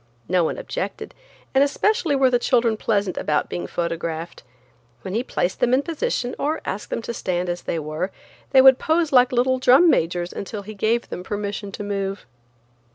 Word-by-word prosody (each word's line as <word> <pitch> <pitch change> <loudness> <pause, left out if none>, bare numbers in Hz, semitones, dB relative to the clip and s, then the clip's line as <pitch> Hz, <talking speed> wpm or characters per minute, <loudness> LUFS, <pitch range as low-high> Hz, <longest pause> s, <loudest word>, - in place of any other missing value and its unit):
No 180 0 +2
one 160 - -1
objected, - - -5 0.4
and 270 +1 +5
especially 335 +2 +1
were 265 -2 +3
the 245 - +3
children 235 -2 +2
pleasant 205 -3 -1
about 150 -1 0
being 175 - -4
photographed. 170 -1 -4 0.6
When 185 - -5
he 225 - +1
placed 185 -7 -2
them 245 +1 +3
in 275 - +1
position, 330 - -2
or 305 +3 -1
asked 205 - -4
them 230 - -3
to 235 - -4
stand 180 -4 -2
as 175 0 -3
they - - -3
were, 155 +4 -3 0.4
they 265 -1 +6
would 265 -1 +8
pose 320 0 +1
like 250 -2 +5
little 255 +1 +2
drum 270 +7 +6
majors 175 +1 0
until 200 +1 -6
he 215 +2 -8
gave 220 +3 0
them - - -5
permission 205 +1 -4
to - - -5
move. 195 -1 -3
215 Hz, 185 wpm, -22 LUFS, 180-260 Hz, 0.6 s, would